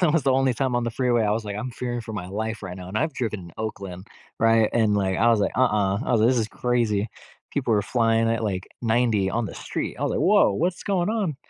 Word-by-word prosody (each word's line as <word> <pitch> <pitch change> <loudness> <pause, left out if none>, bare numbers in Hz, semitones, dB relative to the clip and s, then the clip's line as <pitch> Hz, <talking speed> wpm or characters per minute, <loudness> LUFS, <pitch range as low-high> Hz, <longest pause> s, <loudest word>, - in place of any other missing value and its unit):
that 170 -5 +3
was 165 - +2
the 135 - +4
only 135 0 +3
time 130 +1 -1
on 120 - +1
the 120 - -1
freeway 120 -1 +1
I 105 - +1
was 110 +1 -1
like, 105 -1 -4
"I'm 130 +4 -4
fearing 120 0 -4
for 110 -1 -8
my 95 -4 -5
life 110 +2 -4
right 90 -2 -6
now." 90 -1 -9
And 105 +3 -2
I've 155 +1 0
driven 110 -5 -2
in 85 -2 -12
Oakland, 100 -3 -6 0.3
right? 115 -1 +4
And 110 -3 +2
like, 95 -2 0
I 120 +2 +4
was 115 - +4
like, - - 0
"Uh-uh." 105 -6 +2
I - - -3
was 115 - +3
like, 110 - +5
"This 125 -1 +3
is 110 -1 -1
crazy." 115 -4 0 0.4
People 130 -5 0
were 105 -2 +3
flying 115 0 +2
at 115 0 0
like 95 -3 -2 0.2
90 110 -4 +2
on 115 0 -1
the - - -8
street. - - -4
I - - -4
was - - +1
like, - - -1
"Whoa, - - +5
what's 175 - -1
going 190 -3 0
on?" 200 -11 -1
115 Hz, 270 wpm, -24 LUFS, 105-125 Hz, 0.4 s, like